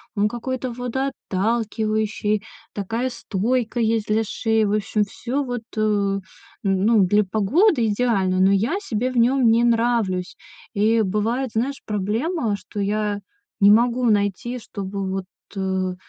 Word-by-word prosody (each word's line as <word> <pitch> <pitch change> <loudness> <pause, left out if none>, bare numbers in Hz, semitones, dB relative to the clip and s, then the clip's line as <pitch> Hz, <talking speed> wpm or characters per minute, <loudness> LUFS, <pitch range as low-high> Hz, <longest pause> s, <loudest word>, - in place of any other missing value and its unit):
он 205 0 +2
какой-то 255 +2 -4
водоотталкивающий, 220 -4 -1 0.3
такая 225 +6 -2
стойка 235 +1 -1
есть 225 -1 +1
для 215 +1 +2
шеи. 220 0 0
В 205 - 0
общем, 210 0 +1
всё 245 +7 -3
вот, 245 -3 -4
э, 205 -2 +1 0.4
ну, 200 +2 +3
для 205 +3 +3
погоды 230 - +2
идеально, 205 -4 +1
но 190 +1 +5
я 225 - +1
себе 250 - -2
в 255 - -4
нем 245 +1 +4
не 230 +1 +4
нравлюсь. 230 -6 +1 0.4
И 220 +2 +3
бывает, 220 +6 0
знаешь, 265 +5 -1
проблема, 220 - -1
что 200 +2 -8
я 205 0 -1 0.4
не 200 -1 +7
могу 240 +3 +3
найти, 210 +3 0
чтобы 195 -3 -5
вот, 190 0 -3 0.3
э, 190 -1 -1
220 Hz, 135 wpm, -22 LUFS, 200-240 Hz, 0.4 s, не